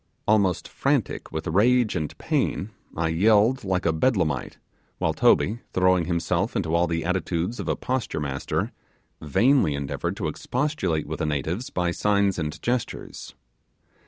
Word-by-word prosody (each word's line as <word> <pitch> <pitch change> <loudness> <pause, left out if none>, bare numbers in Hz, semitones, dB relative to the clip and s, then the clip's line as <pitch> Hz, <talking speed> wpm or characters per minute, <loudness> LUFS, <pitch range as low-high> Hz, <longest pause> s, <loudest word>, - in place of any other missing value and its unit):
Almost 100 -5 +2
frantic - - -1
with 80 0 -4
rage 115 +6 +3
and 75 -1 -3
pain, - - -1 0.3
I 80 0 +1
yelled 105 +8 +3
like 95 -2 -1
a 80 - +3
bedlamite; 80 - 0 0.4
while - - 0
Toby, 110 +4 +3
throwing 90 -2 +3
himself 90 +5 -1
into 85 -7 -1
all 85 +1 +3
the 85 0 -2
attitudes 90 +3 -1
of - - -4
a - - +1
posture 130 -9 -2
master, 70 -2 -2 0.5
vainly 95 - +3
endeavoured 70 -1 -3
to - - -2
expostulate 125 - -1
with 80 +1 -5
the - - 0
natives 80 - -2
by 90 -1 -1
signs 100 0 +1
and 75 -1 -3
gestures. 120 -1 -3
90 Hz, 145 wpm, -25 LUFS, 80-110 Hz, 0.5 s, rage